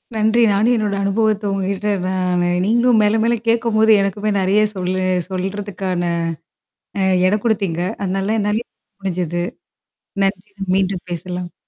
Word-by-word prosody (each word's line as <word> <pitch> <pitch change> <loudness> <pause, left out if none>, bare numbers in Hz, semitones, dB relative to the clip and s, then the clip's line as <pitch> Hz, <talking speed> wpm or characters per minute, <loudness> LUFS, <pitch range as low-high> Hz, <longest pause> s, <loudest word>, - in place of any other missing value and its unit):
நன்றி. 220 +2 +2
நானும் 215 +5 +3
என்னோட 210 -2 -1
அனுபவத்த 210 +1 +1
உங்ககிட்ட. 195 +1 -2 0.2
நானு 180 -1 0 0.2
நீங்களும் 235 +1 +3
மேல, 210 +2 +2
மேல 235 +1 +2
கேட்கும்போது 230 -1 +3
எனக்குமே 205 +2 -1
நெறைய 195 +3 +3
சொல்ல 185 0 -2 0.3
சொல்றதுக்கான 190 -1 -3 1.2
இடம் 200 +2 +1
குடுத்தீங்க. 195 -7 0 0.2
அதனால 195 +3 -1
என்னாலியும் 210 +3 -1
சொல்ல 200 - -56
முடிஞ்சுது. 175 -3 -2 0.8
நன்றி, 195 +1 -2 0.3
மீண்டும் 190 -1 -1
பேசலாம். 180 +1 -5
200 Hz, 120 wpm, -19 LUFS, 185-215 Hz, 1.2 s, நானும்